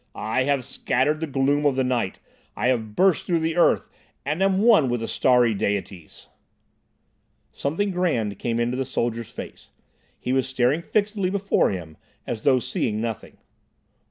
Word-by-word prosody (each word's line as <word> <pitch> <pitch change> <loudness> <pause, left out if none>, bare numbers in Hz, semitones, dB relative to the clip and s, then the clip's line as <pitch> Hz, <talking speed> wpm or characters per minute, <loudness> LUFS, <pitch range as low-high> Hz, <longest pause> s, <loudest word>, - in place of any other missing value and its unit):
"I 120 +4 -1
have 140 -2 +1
scattered 140 +3 0
the 160 - -3
gloom 140 +1 +1
of 145 -3 +2
the 130 - +1
night. 120 -7 -1 0.4
I 120 +4 0
have 110 -4 -1
burst 185 -4 +3
through 170 -2 +1
the 160 0 -1
earth, 175 - +2 0.3
and 150 +6 -2
am 195 +1 +2
one 215 - +5
with 120 -1 -1
the 115 - -3
starry 125 -3 +3
Deities!" 100 -4 -4 1.3
Something 180 +8 -2
grand 120 - -1
came 115 -1 -1
into 120 +1 0
the 135 - 0
soldier's 115 -3 -3
face. - - -10 0.5
He 125 - -2
was 130 -1 +1
staring 130 +4 +1
fixedly 205 0 0
before 200 +1 +1
him, 85 -5 -6 0.3
as 115 -2 -4
though 130 0 +4
seeing 110 -2 -2
nothing. 115 -2 -5
130 Hz, 160 wpm, -24 LUFS, 115-160 Hz, 1.3 s, one